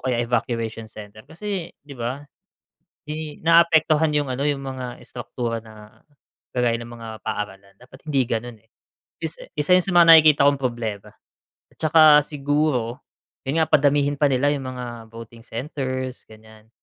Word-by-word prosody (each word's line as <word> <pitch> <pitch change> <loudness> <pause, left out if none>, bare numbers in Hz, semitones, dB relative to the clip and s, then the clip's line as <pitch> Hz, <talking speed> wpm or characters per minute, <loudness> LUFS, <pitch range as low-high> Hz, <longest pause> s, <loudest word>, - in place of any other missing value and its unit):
kaya 125 -2 -1
evacuation 115 -2 -3
center. 105 0 -12
Kasi 185 0 -5 0.2
'di 145 - -11
ba, 120 +3 -4 0.9
'di 155 0 -6
naaapektuhan 160 -2 +4
'yung 145 -2 0
ano, 135 +3 -2
'yung 140 -1 -1
mga 130 -2 -6
istraktura 120 -1 -5
na 110 -1 -15 0.6
kagaya 120 -2 +2
ng 115 - -8
mga 115 -1 -9 0.2
paaralan, 100 -2 -5
dapat 130 +2 -17
hindi 135 -4 +2
gano'n, 120 0 -3
eh. 110 - -35 0.5
Isa 160 -1 -6
isa 150 +3 0
'yon 185 - +3
sa - - -4
mga 170 -1 +7
nakikita 155 -3 +6
kong 140 - -1
problema. 115 -5 -3 0.6
At - - -33
saka 160 +1 +4 0.2
siguro, 145 -5 -1 0.4
'yon 135 +4 -1
nga 160 - +3
padamihin 145 0 +3
pa 145 - +5
nila 140 +2 +2
'yung 140 -2 -5
mga 125 -1 -6 0.2
voting 115 0 -12
centers, 130 +1 -5
ganiyan. 110 0 -17
130 Hz, 155 wpm, -22 LUFS, 115-150 Hz, 0.9 s, mga